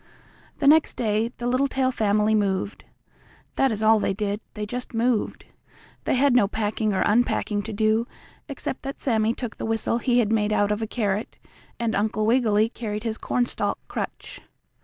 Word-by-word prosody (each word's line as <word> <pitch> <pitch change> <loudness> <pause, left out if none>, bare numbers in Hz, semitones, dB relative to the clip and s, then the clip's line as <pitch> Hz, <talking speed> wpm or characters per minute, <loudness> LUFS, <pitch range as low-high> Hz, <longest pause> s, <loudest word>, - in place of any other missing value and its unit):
The 285 - -2
next 310 +2 +5
day 220 0 0
the 240 - -5
Littletail 260 +1 +1
family 215 -2 +2
moved. 200 -1 -1 0.7
That 270 -2 +2
is 215 0 -2
all 220 0 +5
they 195 - 0
did, 205 +1 -2
they 210 -1 -3
just 245 +2 -6
moved. 230 -1 0 0.6
They - - +2
had 270 0 +3
no 210 -5 +5
packing 215 0 -1
or 190 - 0
unpacking 210 -1 +1
to 220 - -6
do, 220 +2 +1 0.4
except 275 -1 -5
that 275 0 -6
Sammie 225 -2 +1
took 240 -4 -6
the - - -4
whistle 225 +1 0
he 245 -1 +1
had 225 -3 +2
made 210 -1 +1
out 205 0 +2
of 210 +1 -1
a 220 - -2
carrot 210 -2 -2 0.4
and 230 -1 0
Uncle 215 +1 0
Wiggily 220 -2 +3
carried 215 -2 -5
his 225 -1 -3
cornstalk 245 -1 -1
crutch. - - -6
220 Hz, 175 wpm, -24 LUFS, 210-245 Hz, 0.7 s, next